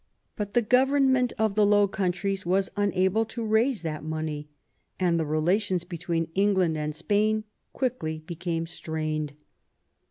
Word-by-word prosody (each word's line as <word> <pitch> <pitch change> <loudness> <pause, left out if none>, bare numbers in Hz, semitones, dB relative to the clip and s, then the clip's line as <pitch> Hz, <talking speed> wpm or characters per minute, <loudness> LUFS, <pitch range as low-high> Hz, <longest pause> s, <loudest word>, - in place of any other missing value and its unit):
But 205 -1 -5
the 240 - +4
government 260 +1 +3
of 220 -2 +1
the 210 +1 +3
Low 205 0 +5
Countries 190 0 -1
was 190 +2 +1
unable 200 +1 +2
to 225 +1 -5
raise 220 +1 +2
that 155 -2 -4
money, 155 -1 -4 0.5
and 175 -2 +2
the 160 - -1
relations 180 +4 +1
between 170 -1 -3
Eng 200 +1 +3
land 175 -4 +2
and 150 0 -3
Spain 215 +5 +1 0.3
quickly 160 - -2
became 170 -1 -3
strained. 155 -3 -3
185 Hz, 140 wpm, -27 LUFS, 160-215 Hz, 0.5 s, Low